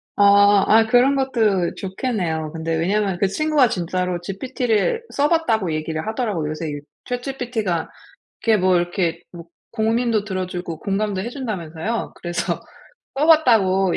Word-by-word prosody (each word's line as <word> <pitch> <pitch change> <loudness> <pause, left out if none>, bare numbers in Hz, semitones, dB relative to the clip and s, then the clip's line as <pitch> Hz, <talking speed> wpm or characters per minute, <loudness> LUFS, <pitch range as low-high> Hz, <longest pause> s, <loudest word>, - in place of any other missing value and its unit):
아 200 0 +5
아 225 +1 +5
그런 250 +4 +4
것도 220 -9 +1
좋겠네요. 185 - -3
근데 165 0 -2
왜냐하면 195 +3 0
그 195 - +3
친구가 300 +3 +2
진짜로 180 0 -2
GPT를 245 - -1
써 285 +1 +2
봤다고 225 - +1
얘기를 155 0 -3
하더라고요. 215 -9 -2
요새 155 +1 -4
이 145 -1 -5 0.3
ChatGPT가 245 - -3 0.6
이렇게 225 -2 +4
뭐 185 0 +3
이렇게 175 -1 -1
뭐 170 -2 -10 0.3
고민도 225 -1 +1
들어 185 -3 -3
주고 175 -3 -6
공감도 200 0 -1
해 210 - -4
준다면서요? 215 - -4
그래서 175 0 -3 0.6
써 300 - +2
봤다고 200 - +4
200 Hz, 350 characters per minute, -21 LUFS, 175-240 Hz, 0.6 s, 아